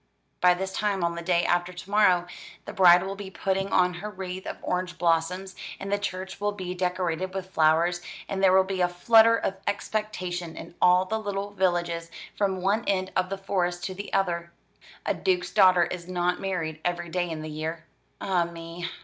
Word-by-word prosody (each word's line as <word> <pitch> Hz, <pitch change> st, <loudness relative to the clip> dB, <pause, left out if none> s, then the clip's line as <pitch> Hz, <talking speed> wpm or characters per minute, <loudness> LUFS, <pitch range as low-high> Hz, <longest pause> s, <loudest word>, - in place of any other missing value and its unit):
"By 180 Hz, 0 st, +5 dB
this 190 Hz, +1 st, -4 dB
time 200 Hz, -2 st, 0 dB
on 170 Hz, 0 st, +1 dB
the 170 Hz, -, -5 dB
day 175 Hz, 0 st, +1 dB
after 175 Hz, +1 st, +1 dB
to 180 Hz, +2 st, -10 dB
morrow, 185 Hz, -4 st, +4 dB, 0.4 s
the -, -, -7 dB
bride 175 Hz, -1 st, +7 dB
will 195 Hz, +1 st, -4 dB
be 200 Hz, -1 st, -7 dB
putting 195 Hz, +1 st, -2 dB
on 180 Hz, -1 st, +3 dB
her 185 Hz, +4 st, -6 dB
wreath 190 Hz, -2 st, -6 dB
of -, -, -5 dB
orange 180 Hz, -1 st, -2 dB
blossoms, 175 Hz, +3 st, 0 dB, 0.2 s
and 195 Hz, +1 st, -5 dB
the 205 Hz, -, +1 dB
church 190 Hz, -1 st, -5 dB
will 205 Hz, 0 st, 0 dB
be 185 Hz, -3 st, -5 dB
decorated 180 Hz, 0 st, -2 dB
with 190 Hz, -1 st, -5 dB
flowers, 165 Hz, +2 st, +3 dB, 0.3 s
and 195 Hz, -1 st, -3 dB
there 190 Hz, -1 st, +6 dB
will 190 Hz, 0 st, +6 dB
be 190 Hz, -1 st, -3 dB
a 180 Hz, -, +4 dB
flutter 225 Hz, +5 st, +5 dB
of 195 Hz, -, -2 dB
expectation 185 Hz, -5 st, -3 dB
in -, -, -9 dB
all 180 Hz, +1 st, +5 dB
the 220 Hz, +4 st, -2 dB
little 200 Hz, -1 st, -4 dB
villages, 175 Hz, -3 st, 0 dB, 0.3 s
from 190 Hz, -3 st, -1 dB
one 205 Hz, +4 st, +2 dB
end 190 Hz, -1 st, 0 dB
of 185 Hz, 0 st, +1 dB
the 195 Hz, -, -3 dB
Forest 180 Hz, -2 st, -1 dB
to 190 Hz, -, -3 dB
the 200 Hz, +2 st, -7 dB
other. 170 Hz, -3 st, 0 dB, 0.5 s
A -, -, +1 dB
duke's 365 Hz, -2 st, 0 dB
daughter 185 Hz, -4 st, +6 dB
is 175 Hz, 0 st, -5 dB
not 180 Hz, 0 st, 0 dB
married 165 Hz, -5 st, -3 dB
every 175 Hz, -1 st, -2 dB
day 175 Hz, +1 st, -1 dB
in 155 Hz, -1 st, -5 dB
the 155 Hz, -, -6 dB
year. 155 Hz, +2 st, -5 dB, 0.3 s
Ah 180 Hz, -3 st, +1 dB
me! 170 Hz, +1 st, -7 dB
185 Hz, 200 wpm, -26 LUFS, 175-195 Hz, 0.5 s, bride